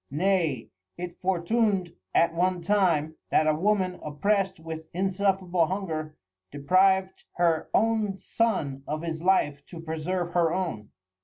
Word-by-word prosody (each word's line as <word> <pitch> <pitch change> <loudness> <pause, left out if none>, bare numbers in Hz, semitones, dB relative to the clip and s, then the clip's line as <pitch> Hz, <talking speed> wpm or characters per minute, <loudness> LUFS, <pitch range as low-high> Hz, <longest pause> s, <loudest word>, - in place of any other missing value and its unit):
Nay 160 -5 0 0.3
it 175 0 -7
fortun'd 190 0 +1 0.2
at 165 0 +4
one 180 +1 0
time, 165 -6 +1
that 155 - +3
a 155 - +3
Woman 185 +2 0
opprest 190 +5 0
with 160 0 -7
insufferable 190 -2 +1
Hunger, 160 -5 -4 0.3
depriv'd 185 +6 +2
her 165 -2 +1
own 220 -3 +1
Son 185 -13 -1
of 155 +2 -3
his 160 -1 -4
Life 145 -6 +2
to 170 - -9
preserve 165 +2 -3
her 170 -2 +3
own. 165 - -3
175 Hz, 130 wpm, -27 LUFS, 160-190 Hz, 0.3 s, at